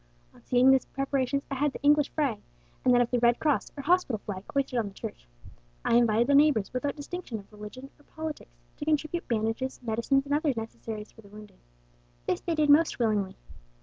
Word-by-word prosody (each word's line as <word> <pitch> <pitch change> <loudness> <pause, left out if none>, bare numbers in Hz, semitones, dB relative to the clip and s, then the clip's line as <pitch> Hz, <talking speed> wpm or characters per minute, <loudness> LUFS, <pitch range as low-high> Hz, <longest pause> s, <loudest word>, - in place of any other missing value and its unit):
On - - -19
seeing 250 +1 +5
these 265 -1 +3
preparations, 275 0 -1
I - - 0
had 280 +1 0
the - - -8
English 295 0 +4
flag, 275 -9 -1 0.4
and 255 - +4
that 245 0 +5
of 240 - 0
the 245 - +2
Red 240 0 +4
Cross 295 -4 0
or 280 - -5
hospital 350 -9 +2
flag, 190 -2 -5
hoisted 275 -3 0
on 220 - -1
the 200 - -9
church. - - -8 0.6
I - - +2
invited 235 -1 +4
the 285 - +2
neighbours, 280 -8 +4
without 270 +3 -2
distinction 300 -4 -6
of 200 0 -13
religion 210 +6 -10
or - - -21
politics, 315 -1 -7 0.2
to 295 - -5
contribute 310 +2 -1
bandages, 225 +3 -1
medicines, 235 +4 +1
and 285 - -2
other 295 -3 +1
necessaries 220 -1 -6
for 225 - -16
the 205 - -17
wounded. 210 +1 -14 0.7
This - - -1
they 335 - -1
did 300 -2 +4
most 315 +3 +4
willingly. 210 -5 0
260 Hz, 205 wpm, -28 LUFS, 225-290 Hz, 0.7 s, seeing